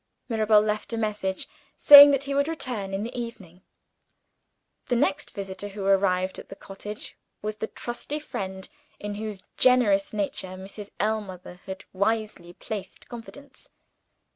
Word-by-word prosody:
Mirabel 215 -2 +4
left 210 +1 -2
a - - -1
message, 210 -4 -2 0.3
saying 285 0 +11
that 275 -1 +1
he 280 0 -3
would 280 +1 +2
return 250 -11 -4
in 195 +1 -2
the 235 - -6
evening. 205 -7 -7 1.3
The 245 - +1
next 195 -5 0
visitor 195 0 -6
who 200 -1 -6
arrived 190 -1 +2
at - - -12
the - - -8
cottage 205 +2 -8 0.3
was 215 0 -3
the 220 - -3
trusty 240 +7 -5
friend, 190 -10 -6 0.3
in 205 0 -5
whose 210 -2 -6
generous 230 -6 +4
nature 190 -2 -3
Mrs. 200 +2 -9
Ellmother 195 -4 -3
had 190 0 -7
wisely 200 -3 -1
placed 195 0 -7
confidence. 240 +4 -11
210 Hz, 140 wpm, -26 LUFS, 195-230 Hz, 1.3 s, saying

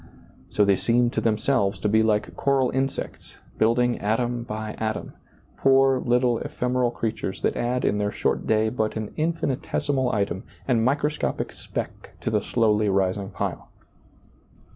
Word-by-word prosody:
So 105 - +3
they 100 -1 +3
seem 120 0 +2
to - - -1
themselves 110 -2 +1
to - - +1
be 110 +2 +4
like 105 -2 +1
coral 135 -2 +2
insects, 135 +1 -3 0.2
building 120 +2 +2
atom 120 +3 0
by 110 -2 -5
atom, 110 -1 -3 0.4
poor 135 -1 +4
little 120 -1 +2
ephemeral 125 0 0
creatures 110 -4 -3
that - - +1
add 125 +1 -1
in 105 - +1
their 105 0 0
short - - -1
day 110 0 +3
but 110 -2 -2
an 110 -2 -4
infinitesimal 145 -4 -1
item 100 -3 -1 0.3
and 120 -4 +2
microscopic 145 +4 -1
speck - - -6
to - - -2
the 105 -1 +2
slowly 105 -2 +2
rising 95 0 0
pile. - - -4
115 Hz, 145 wpm, -25 LUFS, 105-125 Hz, 0.4 s, be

